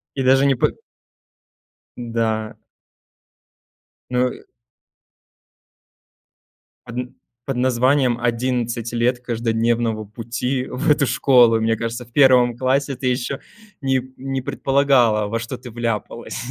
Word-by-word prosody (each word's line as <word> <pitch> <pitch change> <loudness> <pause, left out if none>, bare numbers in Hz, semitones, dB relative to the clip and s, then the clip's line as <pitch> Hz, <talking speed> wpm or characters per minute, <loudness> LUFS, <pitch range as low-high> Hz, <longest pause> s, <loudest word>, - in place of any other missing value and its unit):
И 135 - -1
даже 135 +2 +4
не 135 -2 +3
под - - 0 1.2
Да. 115 -2 -2 1.5
Ну 125 0 +2
и - - -11 2.4
Одн 125 +2 -5 0.3
под 135 -2 -3
названием 125 0 +2
"11 120 -1 -1
лет 120 +1 +1
каждодневного 115 -2 -1
пути 120 +4 -3
в 140 +6 -2
эту 145 -1 +4
школу". 120 -4 +4
Мне 115 0 +1
кажется, 115 +2 -4
в 120 - -23
1 125 -4 +5
классе 135 +2 0
ты 130 +1 -3
еще 125 +2 -1 0.4
не 135 -1 +1 0.2
не 135 0 -3
предполагала, 130 -6 +2
во 115 +2 -2
что 115 +3 -6
ты 125 0 -11
вляпалась, 115 -3 -4
125 Hz, 115 wpm, -21 LUFS, 115-130 Hz, 2.4 s, 1